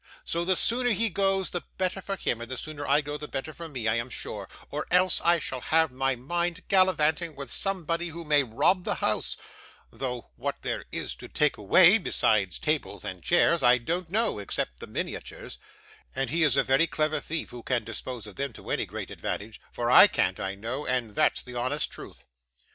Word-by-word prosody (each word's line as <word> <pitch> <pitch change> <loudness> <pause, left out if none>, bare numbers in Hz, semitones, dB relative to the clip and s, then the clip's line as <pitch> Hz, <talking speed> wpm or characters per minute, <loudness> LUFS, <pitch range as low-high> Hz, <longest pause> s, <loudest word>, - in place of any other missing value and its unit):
So 170 +1 -1
the 185 +2 +2
sooner 245 +6 +2
he 225 -1 +2
goes, 195 +1 +1
the 175 - -2 0.2
better 190 +1 -1
for 195 +1 -3
him, 120 -10 -2
and 120 - -7
the 130 - -4
sooner 145 0 -5
I 145 +2 +4
go, 145 +1 -4
the 150 - -7
better 145 +3 -5
for 165 +1 -8
me, 125 -6 -4
I 110 +1 +2
am 115 +2 -3
sure, 105 -5 -5 0.2
or 150 +1 -3
else 180 +1 +3
I 170 0 +5
shall 130 -5 -5
have 160 0 +2
my 135 +1 0
maid 170 +7 -2
gallivanting 170 -4 +2
with 140 -1 -7
somebody 175 -3 -1
who 170 0 -7
may 150 -1 +4
rob 140 - +2
the - - -1
house - - 0 0.5
though 125 -3 -5
what - - -4
there - - -3
is - - -3
to - - -9
take 150 0 +1
away, 180 - +6
besides 105 - +1
tables 150 - -2
and 90 -1 -5
chairs, 170 -1 +3
I 125 0 +6
don't 165 +8 -3
know, 215 - +1
except - - -3
the - - -8
miniatures: - - -5 0.6
and 135 - -1
he 170 +2 +1
is 155 -3 +4
a - - +3 0.2
clever 155 -1 0
thief 165 0 -4
who 120 - -8
can 120 -1 0
dispose 115 +1 -6
of 105 - -12
them 140 -3 -3
to - - -9
any - - 0
great - - -6
advantage, 110 +2 -5
for 120 0 -1
I - - +10
can't, - - 0
I 95 +2 -3
know, 115 +8 -4
and 125 -5 -1
that's - - +2
the 125 - -10
honest 130 +5 0
truth. 60 +1 -11
150 Hz, 205 wpm, -27 LUFS, 120-175 Hz, 0.6 s, I